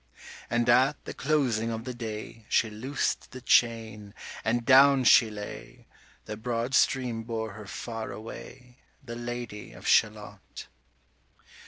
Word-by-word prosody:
And 120 0 0
at 130 +4 +3
the - - -6
closing 130 -7 0
of 115 0 -4
the 125 - -5
day 110 -1 -7
She 110 - +2
loosed 130 +7 -2
the 130 - -9
chain, 110 -4 +1 0.3
and 115 +1 0
down 135 0 +6
she 115 -2 +6
lay; 105 -1 -9 0.4
The 105 - -6
broad 120 +2 -3
stream 125 -4 +2
bore 110 -1 -4
her 105 -1 -10
far 115 +1 -6
away, 125 +3 -10 0.2
The 120 -3 -7
Lady 120 -3 -6
of - - -13
Shalott. - - 0
115 Hz, 135 wpm, -28 LUFS, 110-125 Hz, 0.4 s, down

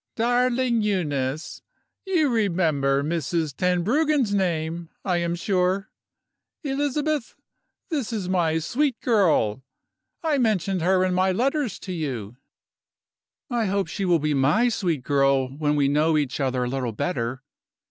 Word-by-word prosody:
"Darling 245 0 +2
Euneece, 155 -8 -2 0.5
you 345 -6 +2
remember 165 - +1
Mrs. 160 -1 -1
Tenbruggen's 220 - +1
name, 170 -3 -1 0.2
I 180 -3 +1
am 170 0 -1
sure? 190 +1 0 0.7
Elizabeth, 290 0 -1 0.5
this 285 -10 -2
is 210 -5 -3
my 170 -4 +1
sweet 250 - 0
girl; 160 - +2 0.6
I 305 -4 +1
mentioned 195 -6 +1
her 185 +2 +3
in 185 - 0
my 185 +1 +2
letters 260 - 0
to 185 - -5
you." 125 - -4 1.2
"I 235 -2 +1
hope 195 +1 0
she 195 +4 -3
will 175 -2 +4
be 150 -1 0
my 150 - +3
sweet 170 - -1
girl, 135 -1 +2
when 150 0 0
we 145 -2 +2
know 155 +3 +2
each 145 -4 -1
other 130 -2 0
a - - -1
little 125 -2 -2
better. 125 -1 -3
180 Hz, 135 wpm, -24 LUFS, 150-230 Hz, 1.2 s, will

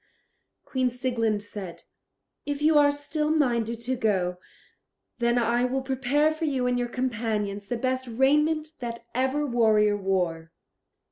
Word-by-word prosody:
Queen 255 -1 0
Sieglind 235 -4 -1
said: 195 -4 -8 0.6
"If 290 -1 -3
you 310 +1 +3
are 290 0 +5
still 300 +1 -2
minded 235 -7 +1
to 255 +2 -1
go, 185 -6 0 0.8
then 235 0 +2
I 240 +1 +2
will 260 +1 -1
prepare 270 +4 +1
for 320 +1 -3
you 265 -4 0
and 250 0 +1
your 245 0 -2
companions 225 -5 -2
the 240 - -2
best 255 +1 -1
raiment 300 +6 +2
that 235 -1 -6
ever 265 +4 0
warrior 220 -5 +3
wore." 180 -5 -1
245 Hz, 140 wpm, -26 LUFS, 220-270 Hz, 0.8 s, are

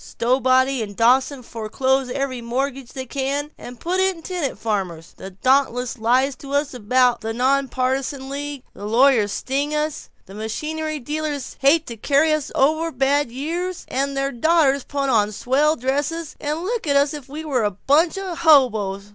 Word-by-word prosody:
Stowbody 260 +1 +2
and 205 -2 -5
Dawson 255 +4 +3
foreclose 260 +4 -1
every 260 -1 -3
mortgage 260 +2 -3
they 260 -1 -5
can, 280 +3 -2
and 245 -1 -11
put 360 +2 -1
in 380 -3 0
tenant 350 -7 -3
farmers. 185 -7 -3
The 190 - -9
Dauntless 250 +3 +1
lies 255 +5 +2
to 275 0 -9
us 285 0 0
about 245 +1 +2
the 225 0 -3
Nonpartisan 265 +1 0
League, 285 -1 -5
the 205 - -7
lawyers 230 -2 +4
sting 280 +6 -2
us, 300 0 -3 0.2
the 195 - -13
machinery 305 +9 -4
dealers 295 0 -4
hate 295 +4 +4
to 235 - -8
carry 290 +7 +3
us 305 -2 -2
over 315 +4 +2
bad 275 0 +1
years, 340 +8 -4
and 275 +2 0
then - - -6
their 275 0 -1
daughters 280 0 +2
put 280 -1 -2
on 210 -3 +2
swell 280 +8 +1
dresses 290 +5 -2
and 300 +2 -2
look 445 -2 -3
at 285 - +2
us 285 +2 +3
as 300 - -4
if 265 - -20
we 310 +3 -7
were 260 -6 0
a 210 - +2
bunch 290 - +2
of 370 -3 -5
hoboes. 220 - +3
275 Hz, 175 wpm, -21 LUFS, 245-300 Hz, 0.2 s, lawyers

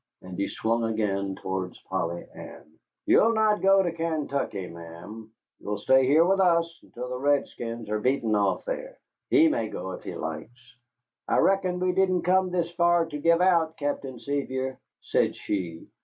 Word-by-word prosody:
And 90 0 -8
he 100 +2 -1
swung 115 +1 -1
again 100 -3 -1
towards 95 -1 -4
Polly 85 -2 -3
Ann. - - -11 0.4
"You'll 230 +1 +5
not 215 -1 +2
go 195 0 +5
to 175 - -1
Kaintuckee, 150 - -2
ma'am; 85 +6 -10 0.3
you'll 105 0 -4
stay 130 +5 +4
here 155 +5 +5
with 195 +2 +2
us 170 -2 +2
until 125 +1 -8
the 125 0 -5
redskins 120 -5 -1
are 105 +1 -1
beaten 120 -2 +1
off 105 - +1
there. - - -5 0.3
He 325 -3 +6
may 300 -1 0
go 95 - -5
if - - -7
he - - -6
likes." 120 +11 -7 0.5
"I - - +2
reckon 185 -2 +2
we 185 0 +1
didn't 185 -1 +1
come 185 +1 +3
this 175 -2 -1
far 175 -1 +3
to 155 -2 -6
give 170 +3 +3
out, 165 -3 +3
Captain 140 -3 -3
Sevier," 130 -1 -3 0.2
said - - +1
she. 85 -5 -4
140 Hz, 170 wpm, -26 LUFS, 105-175 Hz, 0.5 s, He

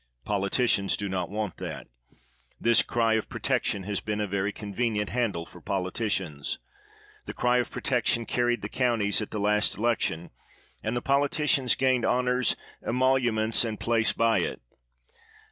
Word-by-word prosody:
Politicians 100 0 +1
do 100 - -3
not 90 -3 -2
want 105 -2 -3
that. - - -6 0.7
This 115 -1 +5
cry 115 -1 +1
of 110 - -4
protection 100 - -1
has 100 0 -2
been 105 -1 -3
a 105 - 0
very 100 +1 -1
convenient 105 0 -2
handle 110 -9 -1
for - - -15
politicians. 95 - -2 0.7
The - - -7
cry 125 0 +2
of 125 - -1
protection 120 -2 0
carried 120 0 0
the - - -2
counties 115 -5 +1
at 105 - -4
the 105 - -4
last 105 +1 +2
election, 105 -7 -1 0.5
and 110 +2 -2
poli 140 +1 +3
ticians 140 -5 +2
gained 130 -2 +2
honors, 125 +1 +2 0.3
emoluments, 120 -3 +2
and 110 -2 -3
place 115 -1 +2
by 115 -1 +2
it. - - -2
110 Hz, 145 wpm, -27 LUFS, 100-125 Hz, 0.7 s, This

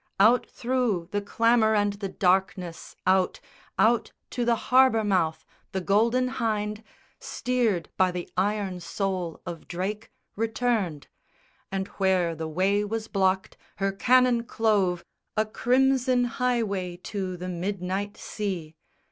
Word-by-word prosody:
Out 225 +5 +5
through 235 -9 -1
the 205 - 0
clamour 225 +1 +3
and 205 -1 +2
the 200 -1 -5
darkness, 185 -3 0
out, 185 0 +2 0.4
Out 230 +1 +3 0.2
to 245 - -1
the 235 0 +3
harbour 255 -2 +4
mouth, 185 -6 0 0.3
the 190 - 0
Golden 230 +7 +2
Hynde, 215 -4 -2 0.4
Steered 235 -8 -1
by 185 -1 +4
the 180 -1 -5
iron 195 -1 0
soul 180 -2 -3
of 170 -2 -7
Drake, 200 +5 -4 0.2
returned: 220 -8 -1 0.7
And 190 0 -2
where 185 -3 +2
the 160 0 -5
way 190 +6 +1
was 220 +1 -3
blocked, 190 -1 0 0.2
her 195 0 0
cannon 245 +3 +3
clove 205 -7 +1 0.3
A 215 - +3
crimson 255 +2 +2
highway 225 -8 -1
to 190 -3 -4
the 180 +1 -6
midnight 190 +2 -3
sea. 185 -7 -4
205 Hz, 125 wpm, -26 LUFS, 185-230 Hz, 0.7 s, Out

